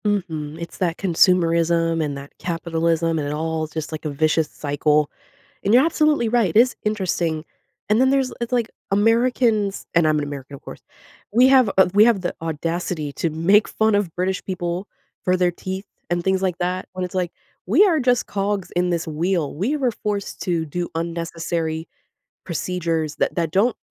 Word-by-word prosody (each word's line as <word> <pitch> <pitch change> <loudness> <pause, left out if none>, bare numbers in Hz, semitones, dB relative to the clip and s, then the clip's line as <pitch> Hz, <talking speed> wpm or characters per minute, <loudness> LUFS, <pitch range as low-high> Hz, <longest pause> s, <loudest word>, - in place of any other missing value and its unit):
Mhm, 160 -7 -2
it's 170 - -8
that 175 -3 0
consumerism 170 -2 +3
and 145 -2 -3
that 140 +1 -11
capitalism, 165 -1 0
and 145 - -2
it 145 - -2
all 160 +1 -2
just 155 0 -5
like 155 - -6
a - - 0
vicious 155 +1 +1
cycle, 150 0 0 0.5
and 200 - +2
you're 255 +5 +6
absolutely 305 -6 +2
right, 220 -7 +1
it - - +8
is 250 +2 +4
interesting. 175 -6 -1 0.4
And 215 +3 +4
then 260 - +4
there's 270 -1 +1
it's 235 - -3
like 235 -2 +1 0.2
Americans- 225 -1 +2
and 170 -2 +4
I'm 155 0 +3
an 150 - -1
American, 140 -1 -7
of - - -14
course- - - -10 0.5
we 250 +3 +6
have 260 -5 +5
a 190 -2 +6
we 205 +1 +7
have 230 -5 +3
the 175 - -2
audacity 165 -1 -3
to 165 - -1
make 170 +7 +3
fun 220 0 +1
of 200 -5 0
British 185 +1 -1
people 180 0 -3 0.4
for 185 0 +2
their 180 -1 +2
teeth 190 +3 -6 0.2
and 175 0 0
things 190 0 +1
like 185 -2 0
that, 180 +1 -2
when 185 0 -3
it's 180 - -9
like, 180 -2 -1 0.4
we 290 - +6
are 335 -6 +3
just 250 -2 +2
cogs 200 -1 -2
in 180 +1 0
this 170 -1 -1
wheel, 165 0 -1
we 225 - 0
were 260 -4 +1
forced 205 -2 -4
to 170 -3 0
do 175 +3 -4
unnecessary 165 -1 -3 0.6
procedures 165 -3 -2
that - - 0
that 165 -3 -1
don't 210 +8 +2
175 Hz, 185 wpm, -22 LUFS, 160-205 Hz, 0.6 s, it